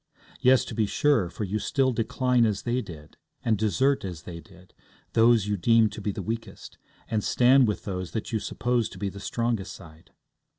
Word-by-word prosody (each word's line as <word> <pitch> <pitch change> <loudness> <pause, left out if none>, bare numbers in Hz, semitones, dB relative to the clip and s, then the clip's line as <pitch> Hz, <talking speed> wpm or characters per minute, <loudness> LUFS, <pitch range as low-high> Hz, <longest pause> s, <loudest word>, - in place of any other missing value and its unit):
Yes, 130 0 +4
to - - -7
be 110 -3 0
sure, 115 -8 +2
for 105 - -6
you 105 +2 -2
still 130 +2 +1
decline 125 +1 +1
as 105 -3 0
they 120 +1 0
did, 75 -8 -12 0.3
and 115 -2 +3
desert 110 +7 +1
as 90 -4 -6
they 85 -2 -8
did, 90 0 -18 0.4
those 115 -2 +4
you 105 0 -1
deem 115 +3 +4
to 105 - -8
be 105 - -1
the - - -6
weakest, 115 +1 -6 0.3
and 110 -2 -1
stand 130 +1 +4
with 105 - -2
those 90 -3 -4
that 110 - -5
you 110 - 0
suppose 120 +1 -1
to - - -12
be 100 +1 -2
the 100 - -10
strongest 115 -1 -2
side. 80 -2 -15
110 Hz, 200 wpm, -26 LUFS, 95-120 Hz, 0.4 s, Yes